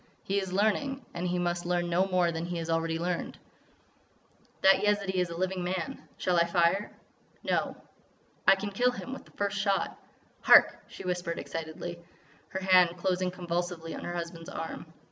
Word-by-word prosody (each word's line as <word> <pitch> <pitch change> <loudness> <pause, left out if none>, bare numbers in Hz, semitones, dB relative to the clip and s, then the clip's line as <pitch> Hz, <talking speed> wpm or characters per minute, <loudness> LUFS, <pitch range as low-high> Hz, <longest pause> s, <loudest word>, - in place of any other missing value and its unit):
He 200 +1 0
is 190 -2 -4
learning.... 225 +7 0
And 175 +1 -2
he 180 0 0
must 175 0 -1
learn 175 0 0
no 175 +3 +2
more 180 -2 +2
than 165 +1 -3
he 175 -1 -3
has 165 0 -3
already 165 0 0
learned." 175 +1 -2 1.3
"That 190 0 +7
Yezidee 200 -3 +2
is 180 - -1
a 170 - -6
living 185 0 -1
man. 180 -1 -4
Shall 180 -1 +1
I 170 - +5
fire?" 170 +4 +2 0.5
"No." - - 0 0.7
"I 195 - +9
can 200 +1 -4
kill 245 +5 +3
him 250 +1 -6
with 270 - -8
the - - -19
first 205 0 -1
shot." 195 -1 0 0.4
"Hark!" - - +6
she - - -10
whispered 180 -2 -2
excitedly, 165 +1 -5 0.5
her 190 - -4
hand 180 -2 +5
closing 185 +1 0
convulsively 175 -2 -3
on - - -6
her 175 - -4
husband's 170 -1 -5
arm. 160 0 -6
180 Hz, 175 wpm, -29 LUFS, 170-190 Hz, 1.3 s, I